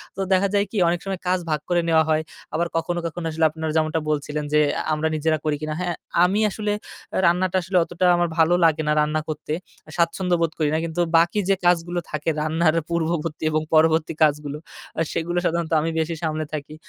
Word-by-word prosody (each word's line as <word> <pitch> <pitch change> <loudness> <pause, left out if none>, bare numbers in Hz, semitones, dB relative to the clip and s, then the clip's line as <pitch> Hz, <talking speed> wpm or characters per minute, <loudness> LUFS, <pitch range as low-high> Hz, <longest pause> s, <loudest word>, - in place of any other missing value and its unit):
তো - - -10
দেখা 190 +1 +3
যায় 200 0 +3
কি? 220 - -4
অনেক 170 +1 +1
সময় 195 -2 -3
কাজ 185 +1 +2
ভাগ 155 -1 +1
করে 175 -1 +3
নেওয়া 160 -1 +5
হয়। 155 0 +3 0.3
আবার 170 +2 0
কখনো, 175 +1 -1
কখনো 165 +1 -4
আসলে 160 +1 +1
আপনার 160 +1 -4
যেমনটা 160 0 +1
বলছিলেন 150 0 -2
যে, 150 - +5 0.2
আ - - -1
আমরা 155 +1 0
নিজেরা 155 +1 +1
করি 150 -1 +1
কিনা। 155 0 -3
হ্যাঁ, 175 -1 -2 0.3
আমি 190 +4 +2
আসলে 210 +1 -3 0.5
রান্নাটা 180 +2 +2
আসলে 185 +1 -1
অতটা 175 +2 -2
আমার 175 0 +2
ভালো 165 +1 +4
লাগে 160 -1 +3
না, 150 - +3
রান্না 150 +1 0
করতে। 155 0 -4 0.3
আ - - -14
স্বাচ্ছন্দ্য 175 +1 +1
বোধ 165 - +1
করি 155 -2 +2
না। 155 - +2
কিন্তু 165 +1 -2 0.2
বাকি 170 +5 +3
যে 195 - +5
কাজগুলো 175 0 +2
থাকে 155 +1 -2
রান্নার 155 +1 +2
আ - - -8
পূর্ববর্তী 165 -2 -2
এবং 155 0 +1
পরবর্তী 160 0 +3
কাজগুলো, 150 -1 +1 0.4
আ - - +2
সেগুলো 170 +1 -2
সাধারণত 170 -1 -1
আমি 160 - -1
বেশি 160 +1 -1
সামলে 155 -1 -1
থাকি। 150 0 -5
165 Hz, 210 wpm, -23 LUFS, 155-175 Hz, 0.5 s, নেওয়া